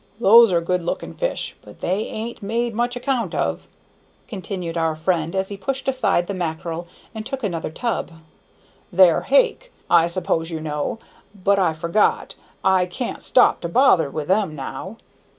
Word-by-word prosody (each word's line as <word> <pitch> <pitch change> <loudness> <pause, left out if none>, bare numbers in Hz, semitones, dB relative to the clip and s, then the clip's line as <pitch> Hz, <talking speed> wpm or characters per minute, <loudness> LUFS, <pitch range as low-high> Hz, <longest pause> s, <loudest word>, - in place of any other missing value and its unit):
"Those 230 0 +7
are 170 -1 +2
good 180 +1 0
looking 170 - -4
fish, - - -3
but - - -15
they 190 +5 -1
an't 230 +2 -6
made 230 +3 -1
much 240 +2 -1
account 245 - -2
of," - - -2 0.6
continued 185 -5 -5
our 165 -1 0
friend, 165 +1 -1
as 190 0 -1
he 200 - -6
pushed 265 +8 -4
aside 220 -9 +2
the 200 - -4
mackerel 170 -1 -4 0.3
and 220 -1 -5
took 265 +3 -5
another 170 -7 -2
tub. 230 +8 -2 0.8
"They're 180 -2 +5
hake, - - +2 0.2
I 170 -1 +6
s'pose 170 -2 -1
you 165 -2 -4
know. 150 +4 -3 0.4
But 200 +1 +2
I 180 -4 +2
forgot, 170 +6 +1 0.3
I 190 -1 +3
can't 235 +7 -5
stop 250 - +4
to 170 - -3
bother 170 - +4
with 150 +1 -5
them 190 -4 +1
now." 145 +9 -7
190 Hz, 165 wpm, -22 LUFS, 170-230 Hz, 0.8 s, Those